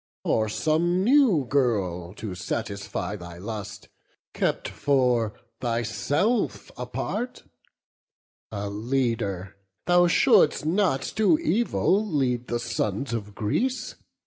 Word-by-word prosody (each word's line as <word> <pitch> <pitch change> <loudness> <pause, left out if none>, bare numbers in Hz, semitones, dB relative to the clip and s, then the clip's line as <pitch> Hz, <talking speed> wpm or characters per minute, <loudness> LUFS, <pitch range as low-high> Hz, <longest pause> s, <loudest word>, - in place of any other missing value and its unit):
Or 110 -1 +1
some 170 - +1
new 235 - +4
girl, 100 -10 0
to 105 -3 -5
gratify 100 +2 -4
thy 85 -2 -10
lust, 105 +1 -7 0.5
Kept - - -1
for 125 -6 +1 0.2
thyself 120 - 0
apart? 245 +1 -4 1.1
a 100 -1 -3
leader, 105 -4 -2 0.3
thou 175 0 +5
Shouldst 150 -3 +4
not 160 -5 +2
to 220 +8 +4
evil 230 - +1
lead 130 - 0
the 120 - -1
sons 115 +1 -2
of 105 -3 -4
Greece. 250 - -1
120 Hz, 100 wpm, -26 LUFS, 105-170 Hz, 1.1 s, thou